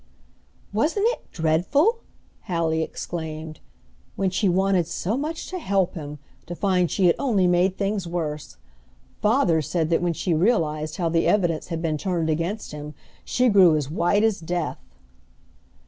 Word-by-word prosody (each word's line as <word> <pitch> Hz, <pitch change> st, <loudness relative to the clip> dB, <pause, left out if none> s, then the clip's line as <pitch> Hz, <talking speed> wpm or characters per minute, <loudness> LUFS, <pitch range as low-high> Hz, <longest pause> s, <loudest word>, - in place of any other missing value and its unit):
"Wasn't 320 Hz, -, +1 dB
it -, -, -6 dB
dreadful!" 180 Hz, -, +2 dB, 0.5 s
Hallie 165 Hz, -2 st, 0 dB
exclaimed. 160 Hz, -1 st, -5 dB, 0.6 s
"When 190 Hz, -1 st, 0 dB
she 190 Hz, +1 st, +1 dB
wanted 185 Hz, -1 st, +2 dB
so 195 Hz, +5 st, -2 dB
much 310 Hz, +5 st, -3 dB
to 370 Hz, -, -3 dB
help 195 Hz, -, 0 dB
him, 150 Hz, -3 st, -7 dB, 0.3 s
to 175 Hz, -, -5 dB
find 180 Hz, -3 st, +1 dB
she 190 Hz, -, +1 dB
had 170 Hz, -, +5 dB
only 220 Hz, -9 st, +2 dB
made 180 Hz, +1 st, +2 dB
things 200 Hz, -2 st, -1 dB
worse. 155 Hz, -, -4 dB, 0.6 s
Father 210 Hz, -, +3 dB
said 160 Hz, +1 st, -1 dB
that 165 Hz, -, +2 dB
when 175 Hz, -1 st, +1 dB
she 175 Hz, +2 st, -1 dB
realized 155 Hz, -4 st, +1 dB
how 175 Hz, -3 st, 0 dB
the 165 Hz, 0 st, +1 dB
evidence 175 Hz, -6 st, +1 dB
had 165 Hz, -1 st, -4 dB
been 155 Hz, -2 st, -1 dB
turned 170 Hz, -4 st, -1 dB
against 170 Hz, +7 st, -3 dB
him 150 Hz, 0 st, -8 dB, 0.3 s
she 250 Hz, 0 st, +1 dB
grew 190 Hz, -7 st, +6 dB
as 145 Hz, -2 st, -2 dB
white 175 Hz, +5 st, +2 dB
as 220 Hz, -3 st, +2 dB
death." 170 Hz, -1 st, -3 dB
175 Hz, 155 wpm, -24 LUFS, 160-200 Hz, 0.6 s, grew